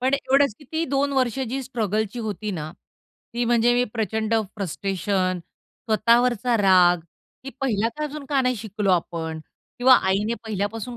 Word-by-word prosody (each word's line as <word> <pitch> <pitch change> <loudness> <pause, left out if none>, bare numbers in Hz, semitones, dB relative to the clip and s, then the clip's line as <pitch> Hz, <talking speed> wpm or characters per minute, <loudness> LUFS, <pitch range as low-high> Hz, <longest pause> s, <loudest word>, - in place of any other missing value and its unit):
पण 260 +2 +2
एवढंच, 275 -3 +2
की 295 - -16
ती 320 +1 0
2 280 0 +1
वर्ष 255 -3 0
जी 265 +1 -2
स्ट्रगलची 220 -2 -2
होती 210 0 -4
ना, 155 -5 -5 0.6
ती 240 - 0
म्हणजे 240 0 +3
मी 245 0 +3
प्रचंड 220 0 -1 0.2
फ्रस्ट्रेशन, 190 0 -1 0.5
स्वतःवरचा 235 +2 +3
राग, 180 -3 +5 0.4
की 270 - -6
पहिल्यापासून 270 +5 -2
का 275 -2 +2
नाही 255 -1 +1
शिकलो 210 -2 -2
आपण? 165 -2 -2 0.4
किंवा 255 +1 +7
आईने 205 +4 +1
पहिल्यापासून 220 +3 -4
225 Hz, 140 wpm, -23 LUFS, 200-255 Hz, 0.6 s, किंवा